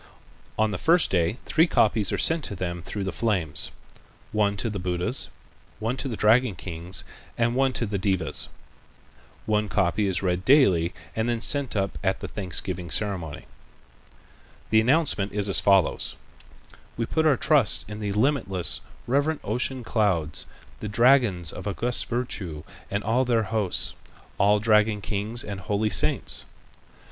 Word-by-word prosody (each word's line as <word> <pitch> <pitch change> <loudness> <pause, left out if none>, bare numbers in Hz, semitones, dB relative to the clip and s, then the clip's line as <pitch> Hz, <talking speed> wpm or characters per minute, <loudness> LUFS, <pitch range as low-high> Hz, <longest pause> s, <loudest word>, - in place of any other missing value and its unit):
On 110 0 +2
the - - -4
first 170 +2 +3
day 85 +4 +1
three 160 +2 +3
copies 110 - +2
are - - 0
sent 165 -1 +2
to 100 - -4
them 85 -1 -4
through 100 +4 -4
the 95 - -2
flames, 95 -10 -1 0.6
one 105 -1 +1
to 95 - -2
the 105 -3 -3
Buddhas, 90 0 -1 0.5
one 115 +3 -1
to 135 - -3
the 115 -5 -4
dragon 110 0 +3
kings 85 0 -5 0.3
and 115 0 +1
one 135 +1 +2
to 120 - -1
the 100 -2 -3
devas. 95 -1 -1 1.0
One 105 -1 0
copy 100 +1 +1
is 95 -1 -1
read 90 -1 0
daily 95 - +4 0.2
and 110 +2 0
then 120 -1 0
sent 140 +1 +1
up 100 -1 -1
at 95 -1 0
the - - -5
thanksgiving 90 -2 -3
ceremony. 90 -6 -2 1.3
The 110 0 +5
announcement 125 -6 +1
is 105 -1 +1
as 95 -6 +4
follows: 95 -1 +2 0.8
"We 115 - -1
put 160 +6 +1
our 140 -4 +4
trust 145 -8 +3
in 105 +1 -7
the 105 -2 -2
limitless, 105 - 0 0.2
reverent 145 +5 0
ocean 125 +4 -1
clouds, 95 -10 0 0.3
the 105 - -5
dragons 115 - +3
of - - -7
august 120 +5 +2
virtue 95 -11 -3 0.3
and 100 +1 -2
all 115 +5 +2
their 120 -3 +1
host, 105 -5 0 0.5
all 105 +2 +4
dragon 105 0 +3
kings 105 +4 -2
and 100 -2 -6
holy 105 +2 -1
saints. - - +1
105 Hz, 155 wpm, -25 LUFS, 95-120 Hz, 1.3 s, The